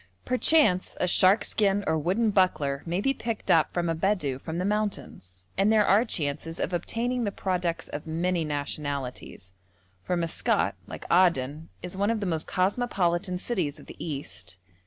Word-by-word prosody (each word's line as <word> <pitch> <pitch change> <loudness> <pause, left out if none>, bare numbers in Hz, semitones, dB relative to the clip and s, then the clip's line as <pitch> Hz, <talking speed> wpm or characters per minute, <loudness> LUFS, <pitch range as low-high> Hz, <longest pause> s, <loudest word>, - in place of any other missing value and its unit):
Perchance 255 - +3
a 180 - +1
shark 185 +4 +5
skin 205 -1 +1
or 160 - +1
wooden 190 +8 +1
buckler 150 -8 +1
may 175 +3 -1
be 270 +5 +1
picked 230 -4 -3
up 160 -2 +4
from 175 -1 -1
a 165 - +1
Bedou 160 -6 -1
from 160 +3 -5
the 180 - -1
mountains, 195 - -3
and 200 +2 +4
there 215 -2 +4
are 205 +4 +4
chances 165 - -3
of - - -2
obtaining 235 +8 -1
the 205 - -1
products 180 -4 -2
of 145 +2 -7
many 170 +2 0
nationalities, 145 - -5 0.5
for 180 - -2
Maskat, 165 -1 +1
like - - -8
Aden, 160 -4 +2
is 180 +1 -5
one 200 +2 0
of 230 -1 0
the 205 - -3
most 165 -3 -1
cosmopolitan 185 -3 0
cities 180 -8 -2
of - - -14
the - - -11
East. 95 - -6
180 Hz, 170 wpm, -27 LUFS, 155-200 Hz, 0.5 s, shark